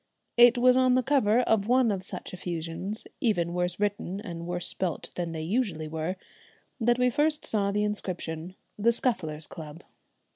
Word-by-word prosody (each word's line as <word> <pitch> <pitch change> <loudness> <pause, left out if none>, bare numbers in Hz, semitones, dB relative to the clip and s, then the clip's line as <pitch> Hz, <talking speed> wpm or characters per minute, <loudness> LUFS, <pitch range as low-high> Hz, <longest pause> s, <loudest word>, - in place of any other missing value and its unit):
It 240 +1 +7
was 250 +1 +5
on 255 -1 +4
the 255 - +2
cover 245 -4 +3
of 220 -4 +1
one 250 -2 +4
of 195 -2 -2
such - - -7
effusions, 175 +3 -5
even 175 -7 +1
worse 180 +1 -1
written 205 -2 -1
and 170 -5 -7
worse 175 0 -1
spelt 185 -3 -2
than 175 -2 -3
they 160 -1 -4
usually 180 -5 -1
were, 160 +4 -3 0.6
that 240 +1 +3
we 250 0 +3
first 300 +4 +1
saw 200 -2 0
the 210 +1 +1
inscription, 180 -4 -4 0.2
the 225 +3 +4
"Scufflers' 160 -11 -1
Club." 160 0 -10
200 Hz, 170 wpm, -28 LUFS, 170-240 Hz, 0.6 s, It